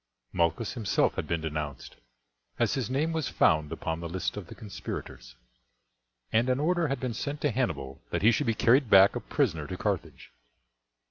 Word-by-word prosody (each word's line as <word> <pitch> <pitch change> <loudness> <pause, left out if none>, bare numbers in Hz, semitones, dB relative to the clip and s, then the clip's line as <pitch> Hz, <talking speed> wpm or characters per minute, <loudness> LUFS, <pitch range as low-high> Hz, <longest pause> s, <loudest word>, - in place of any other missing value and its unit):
Malchus 85 +5 0
himself 110 -6 +1
had - - -4
been 85 -1 -1
denounced, 75 -3 -5 0.6
as - - +1
his 130 -3 -2
name 150 +5 0
was 160 -4 -1
found 75 -1 +2
upon 80 0 -3
the 85 0 -5
list 90 +2 -2
of 105 -4 -7
the - - -10
conspirators, - - -7 1.0
and 115 +3 +2
an 130 +1 +2
order 170 +2 +1
had 135 -1 -2
been 125 -3 -3
sent 145 +5 -4
to 145 - +1
Hannibal 70 - -2
that - - -2
he 110 - +7
should 120 +4 0
be 115 - +2
carried 125 +2 +4
back 95 0 +7
a - - -1
prisoner 75 -2 -1
to 95 - -5
Carthage. 85 -12 -3
105 Hz, 185 wpm, -28 LUFS, 80-130 Hz, 1.0 s, he